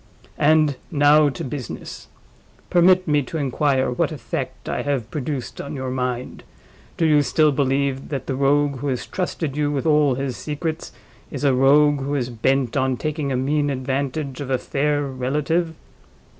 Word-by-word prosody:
And 155 -2 +4
now 145 0 +5
to 130 - -6
business! 130 -2 -7 0.6
Permit 185 +1 +5
me 150 -1 +3
to 145 +5 -5
inquire 135 -2 +1
what 125 - 0
effect 140 -7 -5
I - - -2
have 135 -6 -2
produced 140 -2 -4
on 140 - -6
your 130 -1 -4
own - - -3
mind? 125 -1 -3 0.5
Do 165 - +2
you 150 -2 +5
still 155 +1 +3
believe 135 -1 0
that 135 -4 -4
the 135 - -2
Rogue 140 +1 +2
who 140 +3 -4
has 130 -3 -2
trusted 165 -6 -3
you 145 -1 0
with 140 0 -2
all 150 -4 +3
his 135 -1 -3
secrets 155 +1 -4 0.4
is - - -6
a 140 -2 +4
Rogue 145 +3 +4
who 140 +2 -2
is 125 -3 -2
bent 125 +2 0
on 130 -2 +1
taking 150 -1 -2
a 130 - 0
mean 145 +3 +1
advantage 135 +1 -3
of 135 - -5
a 130 - +2
fair 145 +3 0
relative?" 150 +6 -1
140 Hz, 170 wpm, -22 LUFS, 130-150 Hz, 0.6 s, now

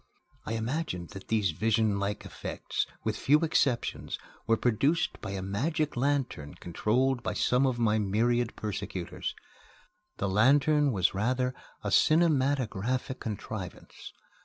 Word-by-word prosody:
I 110 - -1
imagined 115 - -2
that 95 -1 -10
these 105 -5 +2
visionlike 105 +1 0
effects, - - -3 0.2
with - - -1
few 150 +4 +3
exceptions, 140 -6 0 0.3
were 115 - +4
produced 135 +9 +1
by 105 - -5
a 95 -1 -3
magic 150 - -1
lantern 130 - -1
controlled 120 +9 0
by - - -2
some 130 +2 +3
of 125 -2 0
my 110 -2 +2
myriad 115 +4 +1
persecutors. 95 -4 -4 0.8
The 100 - -1
lantern 140 +8 +4
was 95 -5 +2
rather 125 +5 0 0.3
a - - -2
cinematographic 130 - +2
contrivance. 105 -3 -7
120 Hz, 120 wpm, -29 LUFS, 105-135 Hz, 0.8 s, were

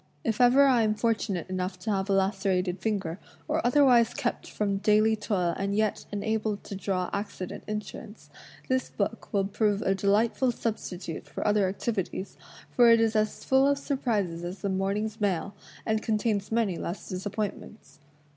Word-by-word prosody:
If 225 +1 0
ever 250 +3 +6
I 255 -4 +4
am 215 -1 +2
fortimate 215 -6 -1
enough 185 0 -3
to 215 - -2
have 195 0 -1
a - - +3
lacerated 190 -1 +1
finger, 195 -5 -2 0.3
or - - 0
otherwise 245 -2 +4
kept - - -3
from 200 -2 -1
daily 215 +2 +3
toil 195 -5 -1
and 200 0 -1
yet 215 -1 0
enabled 210 0 -2
t6 195 - -7
draw 185 -2 -1
accident 200 -3 -5
insurance, 210 0 -7 0.4
this 260 -1 0
book 215 +2 -3
will 200 -2 +1
prove 205 0 0
a 195 - +2
delightful 210 +6 +2
substitute 185 -8 -5
for - - -5
other 205 -2 +3
activities, 195 -1 -3 0.4
for 240 -1 +6
it 230 0 +7
is 225 -1 +2
as 215 0 0
full 265 +1 +4
of 285 0 +2
surprises 215 - -1
as 180 +3 -6
the 200 - -1
morning's 200 +3 -1
mail, 200 0 0 0.3
and 220 -1 +1
contains 215 -2 -1
many 220 -6 +1
less 175 - -5
disappointments. 205 +3 -5
210 Hz, 165 wpm, -28 LUFS, 195-225 Hz, 0.4 s, it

